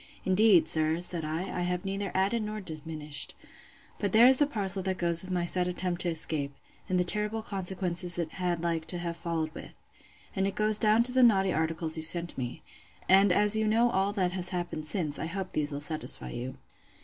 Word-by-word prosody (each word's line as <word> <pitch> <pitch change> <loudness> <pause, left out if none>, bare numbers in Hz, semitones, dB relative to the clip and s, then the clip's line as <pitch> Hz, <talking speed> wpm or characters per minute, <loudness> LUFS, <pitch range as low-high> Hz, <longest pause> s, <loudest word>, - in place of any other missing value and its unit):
Indeed, 190 -3 +4
sir, 160 0 +1
said 175 -2 -2
I, 155 +2 -3
I 180 - -5
have 180 +1 -3
neither 195 0 -3
added 195 +5 +1
nor 215 0 -5
diminished. 155 -4 -3 0.6
But 205 - -2
there 225 +2 +7
is 260 +1 +6
the 290 - +3
parcel 200 -7 +2
that 190 0 -2
goes 170 0 +4
on - - -9
with 185 - -5
my 175 -1 -1
sad 180 +1 +3
attempt 180 0 -3
to 175 - 0
escape, 155 -4 +1 0.3
and 185 -1 +1
the - - +3
terrible 210 +4 -3
consequences 180 -3 +1
it 170 -2 -3
had 175 -2 -3
like 165 -2 -2
to 180 - 0
have 170 -1 -4
been 170 - -17
followed 165 -2 -3
with. - - -11 0.6
And 195 0 0
it 195 - -4
goes 215 0 +4
down 215 +1 +4
to 250 - +2
the 260 +1 +2
naughty 195 -6 +3
articles 160 0 0
you - - -3
sent 170 +1 -1
me. 125 -2 -6 0.4
And 195 +1 +5
as 210 +3 +3
you 220 0 0
know 230 +3 +2
all 195 -1 0
that 185 -4 -1
has 180 -1 -2
happened 175 -4 -5
since, 155 -2 -2
I 160 - -3
hope 190 +2 -6
these 150 0 -1
will 145 0 -5
satisfy 145 - -1
you. 125 +2 -6
180 Hz, 220 wpm, -28 LUFS, 165-200 Hz, 0.6 s, there